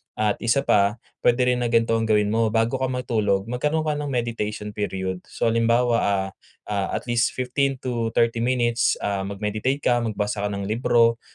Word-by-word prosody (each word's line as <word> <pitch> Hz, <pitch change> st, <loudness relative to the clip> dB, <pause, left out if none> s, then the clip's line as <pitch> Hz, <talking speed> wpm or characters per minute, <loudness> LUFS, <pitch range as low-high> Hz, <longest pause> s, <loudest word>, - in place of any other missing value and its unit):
At 105 Hz, -1 st, 0 dB
isa 120 Hz, +4 st, +1 dB
pa 100 Hz, +1 st, +3 dB, 0.2 s
puwede 120 Hz, +1 st, +3 dB
rin 125 Hz, 0 st, +2 dB
na 120 Hz, -, 0 dB
ganto 115 Hz, -1 st, +2 dB
ang 110 Hz, -, -1 dB
gawin 105 Hz, -1 st, +2 dB
mo 115 Hz, 0 st, +2 dB
bago 115 Hz, +4 st, 0 dB
ka 130 Hz, -, 0 dB
matulog 110 Hz, -6 st, 0 dB
magkaroon 150 Hz, +6 st, 0 dB
ka 150 Hz, -1 st, -1 dB
ng 145 Hz, -, -3 dB
meditation 115 Hz, -5 st, -3 dB
period. 95 Hz, -3 st, -3 dB
So, 115 Hz, -, -1 dB
halimbawa, 115 Hz, +1 st, +2 dB
ah, 95 Hz, -1 st, 0 dB, 0.4 s
ah, 100 Hz, -2 st, 0 dB
at -, -, -3 dB
least 120 Hz, -1 st, 0 dB
15-30 125 Hz, -3 st, 0 dB
minutes, 120 Hz, 0 st, +1 dB
ah, 100 Hz, -1 st, -1 dB
mag-meditate 105 Hz, +7 st, -2 dB
ka 120 Hz, -1 st, +3 dB
magbasa 105 Hz, -2 st, -2 dB
ka -, -, -4 dB
ng 100 Hz, -, -4 dB
libro. 115 Hz, 0 st, +3 dB
115 Hz, 175 wpm, -23 LUFS, 105-125 Hz, 0.4 s, pa